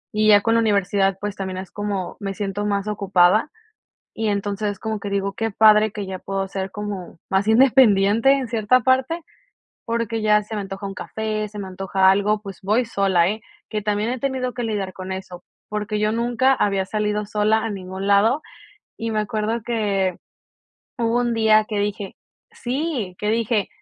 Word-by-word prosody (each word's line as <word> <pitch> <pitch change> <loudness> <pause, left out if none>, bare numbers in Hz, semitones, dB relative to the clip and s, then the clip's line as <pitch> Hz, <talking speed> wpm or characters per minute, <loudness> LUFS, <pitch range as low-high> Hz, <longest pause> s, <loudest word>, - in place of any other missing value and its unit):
y 215 0 +3
ya 205 -1 +7
con 225 +2 +1
la 230 - +4
universidad, 200 -3 +1
pues, 205 0 -4
también 190 -2 -5
es 185 -1 -7
como, 200 -3 -4
me 195 -1 -4
siento 205 0 -3
más 200 0 -1
ocupada, 200 - +3 0.6
y 220 0 -2
entonces, 205 0 -2
como 220 -1 -3
que 200 - -5
digo: 200 0 -1
"Qué 225 +2 -2
padre 215 +1 +5
que 205 -2 -5
ya 190 -1 -6
puedo 195 0 -3
ser 190 0 -4
como 205 -4 -6
más 190 +2 +1
independiente 225 -2 +5
en 270 -2 -1
cierta 230 +2 +2
parte", 260 +7 +1 0.6
porque 230 -1 -2
ya 210 0 +3
se 215 +1 -7
me 205 - -2
antoja 195 0 -6
un 195 - -6
café, 215 +1 -3
se 210 0 -8
me 195 - -6
antoja 190 0 +2
algo, 205 +2 +2
pues 195 -4 -9
voy 215 +6 +2
sola, 190 -5 +2
¿eh?, 215 +1 -4 0.3
que 215 -1 -3
también 210 +2 0
he 255 - -2
tenido 260 -1 -2
que 245 - -4
lidiar 205 -4 -2
con 185 0 -6
eso, 185 -2 -8 0.2
porque 210 0 -3
yo 210 0 +2
nunca 240 +3 +2
había 195 -5 0
salido 210 0 -1
sola 210 +1 +2
a 225 - -2
ningún 190 0 -5
lado, 220 +9 +4 0.5
y 225 0 -3
me 215 -1 0
acuerdo 215 +1 -2
que 200 -6 0 0.8
hubo 230 0 +1
un 240 -1 0
día 215 -1 +4
que 210 - -2
dije 205 -1 -3 0.4
sí, 250 - -3
que 210 - -2
dije 225 -2 0
210 Hz, 185 wpm, -22 LUFS, 195-225 Hz, 0.8 s, ya